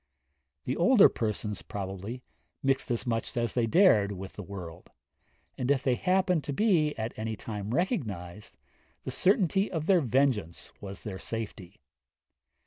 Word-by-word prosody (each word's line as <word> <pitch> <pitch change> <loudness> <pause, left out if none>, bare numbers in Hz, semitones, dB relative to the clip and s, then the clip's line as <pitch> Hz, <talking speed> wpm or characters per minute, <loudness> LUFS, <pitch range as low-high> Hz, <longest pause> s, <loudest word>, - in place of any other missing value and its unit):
The 130 - -1
older 195 +6 +6
persons, 105 -2 -3
probably, 100 +5 -6 0.4
mixed 135 0 +1
as 120 +1 -1
much 115 +1 -2
as 120 -1 0
they 120 -2 +1
dared 110 - +5
with 95 0 -8
the - - -7
world; 90 -4 -9 0.7
and, 125 - -1
if 140 -2 +2
they 130 - +2
happened 180 +2 +1
to 145 - -3
be 165 -5 +2
at 110 +1 -3
any 110 0 -3
time 105 -2 -6
recognised, 105 - -3 0.5
the - - -4
certainty 195 0 +2
of 160 -3 -2
their 185 -1 +4
vengeance 125 - 0
was 100 -2 -8
their 95 -3 -6
safety. 105 -4 -6
120 Hz, 145 wpm, -29 LUFS, 105-155 Hz, 0.7 s, older